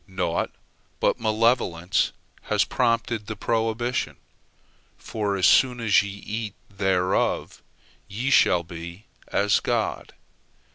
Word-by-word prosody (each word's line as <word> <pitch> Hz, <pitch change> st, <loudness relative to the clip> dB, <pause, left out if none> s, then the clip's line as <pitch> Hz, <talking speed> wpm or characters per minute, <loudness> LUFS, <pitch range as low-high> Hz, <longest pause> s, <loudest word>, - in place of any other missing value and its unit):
Naught 95 Hz, -1 st, -1 dB, 0.5 s
but -, -, +1 dB
malevolence 110 Hz, -5 st, +1 dB, 0.3 s
has -, -, +2 dB
prompted 115 Hz, -3 st, 0 dB
the 110 Hz, -, -4 dB
prohibition, 115 Hz, +3 st, -1 dB, 0.8 s
for 105 Hz, -2 st, -3 dB
as 95 Hz, -, +2 dB
soon 125 Hz, -1 st, +5 dB
as 110 Hz, -4 st, +4 dB
ye 100 Hz, -, -5 dB
eat 105 Hz, +2 st, -5 dB, 0.2 s
thereof, 95 Hz, -2 st, 0 dB, 0.5 s
ye 125 Hz, +7 st, -2 dB
shall 90 Hz, -9 st, +5 dB
be 85 Hz, +4 st, -9 dB, 0.2 s
as 100 Hz, +1 st, +2 dB
God. -, -, -2 dB
105 Hz, 105 wpm, -25 LUFS, 95-115 Hz, 0.8 s, soon